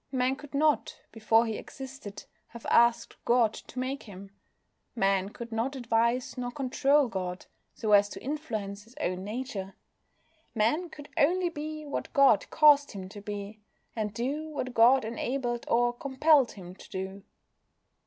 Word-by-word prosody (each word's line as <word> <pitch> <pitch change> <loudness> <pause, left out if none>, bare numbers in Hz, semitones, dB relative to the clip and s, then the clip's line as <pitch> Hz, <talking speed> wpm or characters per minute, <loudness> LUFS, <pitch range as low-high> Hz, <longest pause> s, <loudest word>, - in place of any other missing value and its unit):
Man 260 0 +1
could 290 0 -11
not, 300 0 +1
before 225 +1 +3
he 220 -2 -3
existed, 265 -6 -9 0.2
have 235 -1 -12
asked 235 0 +3
God 235 -2 +3
to - - -12
make 260 +2 -2
him. 195 -2 -11 0.6
Man 195 -3 +1
could 235 +2 -9
not 230 +5 -1
advise 235 +1 0
nor 245 0 -2
control 275 +2 +2
God 185 -4 -4 0.3
so 215 -2 -2
as 205 0 +6
to - - -9
influence 220 -9 -4
his 230 +3 -20
own 185 -8 -2
nature. 210 -3 -5 0.8
Man 270 +12 +1
could 290 -2 -11
only 350 +4 +3
be 310 -1 -6
what 285 - -4
God 275 -7 +5
caused 295 -3 +5
him 190 -2 -7
to 205 +1 -10
be, 205 +1 -6 0.4
and 215 -2 -2
do 275 +9 -3
what 255 -4 -4
God 240 +2 +5
enabled 240 +1 -3
or 240 +1 +3
compelled 275 +1 +3
him 180 -3 -10
to 190 - -15
do. 190 +1 -6
240 Hz, 155 wpm, -29 LUFS, 210-275 Hz, 0.8 s, as